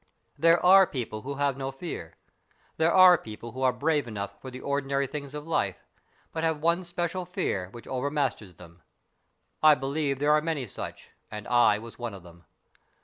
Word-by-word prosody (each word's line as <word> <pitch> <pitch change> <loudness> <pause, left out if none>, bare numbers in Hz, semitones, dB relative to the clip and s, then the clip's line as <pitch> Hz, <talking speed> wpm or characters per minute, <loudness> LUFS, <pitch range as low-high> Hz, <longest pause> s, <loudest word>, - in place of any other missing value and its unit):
There 165 +1 +4
are 190 +1 +8
people 115 -5 -5
who 140 +4 -5
have 140 -1 0
no 135 -1 -3
fear. 135 - -7 0.6
There 160 +1 +3
are 185 -1 +8
people 115 +2 -9
who 130 +3 -7
are 130 -1 +4
brave 145 +2 0
enough 100 -2 -6
for 130 - -7
the 130 0 -8
ordinary 140 0 -1
things 140 0 -7
of 150 +1 -7
life, 100 - 0 0.6
but 160 - -3
have 160 -2 +1
one 170 +3 +1
special 175 +1 -3
fear 175 - -3
which 115 +4 -12
overmasters 130 - -2
them. 85 -1 -15 0.8
I 155 -1 +7
believe 140 +1 -2
there 145 +2 +2
are 150 0 +4
many 155 -4 -2
such, 105 - -8 0.2
and 105 -1 -7
I 120 -4 +4
was 115 +2 -11
one 120 -4 -4
of 95 - -12
them. 85 -1 -16
140 Hz, 185 wpm, -27 LUFS, 115-160 Hz, 0.8 s, are